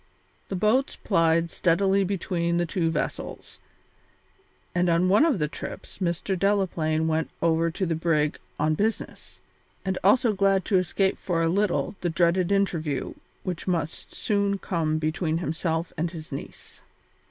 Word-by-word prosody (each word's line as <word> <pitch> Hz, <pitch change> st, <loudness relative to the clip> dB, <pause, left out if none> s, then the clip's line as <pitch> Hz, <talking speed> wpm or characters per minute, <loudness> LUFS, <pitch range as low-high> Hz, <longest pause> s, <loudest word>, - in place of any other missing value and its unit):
The 195 Hz, -, -2 dB
boats 215 Hz, +8 st, +2 dB
plied 165 Hz, -3 st, +2 dB
steadily 195 Hz, +3 st, +2 dB
between 175 Hz, -3 st, -1 dB
the 175 Hz, -, +1 dB
two 165 Hz, 0 st, 0 dB
vessels, 160 Hz, -, -4 dB, 1.1 s
and 180 Hz, 0 st, +2 dB
on 170 Hz, +2 st, +3 dB
one 205 Hz, +8 st, +5 dB
of 315 Hz, -8 st, +3 dB
the 150 Hz, -3 st, 0 dB
trips 150 Hz, -, -8 dB
Mr. 180 Hz, +1 st, -1 dB
Delaplaine 175 Hz, -5 st, +1 dB
went 160 Hz, 0 st, 0 dB
over 165 Hz, 0 st, +2 dB
to 185 Hz, +4 st, -2 dB
the 170 Hz, -, 0 dB
brig 155 Hz, -2 st, +1 dB, 0.2 s
on 155 Hz, +1 st, +2 dB
business, 215 Hz, +7 st, -3 dB, 0.5 s
and 190 Hz, -1 st, -1 dB
also 225 Hz, +4 st, +4 dB
glad 195 Hz, -1 st, +2 dB
to 190 Hz, -4 st, +3 dB
escape 190 Hz, +2 st, 0 dB
for 165 Hz, -3 st, 0 dB
a -, -, +3 dB
little 200 Hz, +3 st, 0 dB
the 175 Hz, -, 0 dB
dreaded 170 Hz, +2 st, +2 dB
interview 165 Hz, -8 st, 0 dB, 0.3 s
which 180 Hz, -1 st, -4 dB
must 165 Hz, -4 st, -2 dB
soon 200 Hz, -1 st, 0 dB
come 165 Hz, -5 st, -1 dB
between 155 Hz, +1 st, -1 dB
himself 165 Hz, 0 st, -2 dB
and 165 Hz, +1 st, -1 dB
his 160 Hz, -2 st, -9 dB
niece. 135 Hz, -, -9 dB
175 Hz, 150 wpm, -26 LUFS, 160-195 Hz, 1.1 s, one